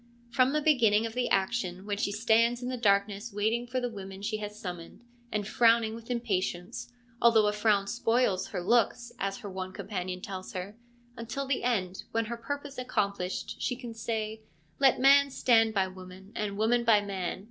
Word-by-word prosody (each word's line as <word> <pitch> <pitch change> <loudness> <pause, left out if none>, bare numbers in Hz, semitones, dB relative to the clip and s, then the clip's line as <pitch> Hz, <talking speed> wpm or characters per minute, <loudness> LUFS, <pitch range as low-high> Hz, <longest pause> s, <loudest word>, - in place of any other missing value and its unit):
From 255 +1 +3
the 300 0 0
beginning 230 -8 +4
of 225 - -4
the 250 0 0
action, 190 -2 0
when 205 -1 -2
she 205 - 0
stands 230 +3 +2
in 250 - -2
the 255 - -2
darkness 205 -1 +1
waiting 220 +4 0
for 255 +1 -1
the 245 - -1
women 195 -3 -8
she 215 +1 -1
has 210 0 -7
summoned, 175 +3 -8 0.3
and 205 -2 -2
frowning 230 -1 +4
with 230 +1 -10
impatience 210 -3 -2
— 240 0 -33
' 230 0 -30
although 230 -2 +6
a 210 - +2
frown 210 -1 +2
spoils 225 -3 +1
her - - -4
looks,' 235 +4 +1
as 195 0 -2
her 205 - -6
one 185 0 -5
companion 185 -3 -4
tells 185 0 -7
her 185 +3 -5 0.2
— 240 0 -32
until 235 +4 -4
the 270 -1 -1
end, 190 -7 -1
when, 225 0 +1
her 235 +2 -5
purpose 285 +2 -5
accomplished, 200 -7 -2
she 250 - 0
can 240 -2 -8
say, 220 -1 -3 0.4
1 270 -1 +7
Let - - -2
man 280 +2 +6
stand 225 -4 +3
by 195 -1 +3
woman 185 +1 -12
and 205 -2 -3
woman 235 +3 +2
by 220 -3 +5
man. 195 -3 -3
220 Hz, 200 wpm, -29 LUFS, 200-240 Hz, 0.4 s, 1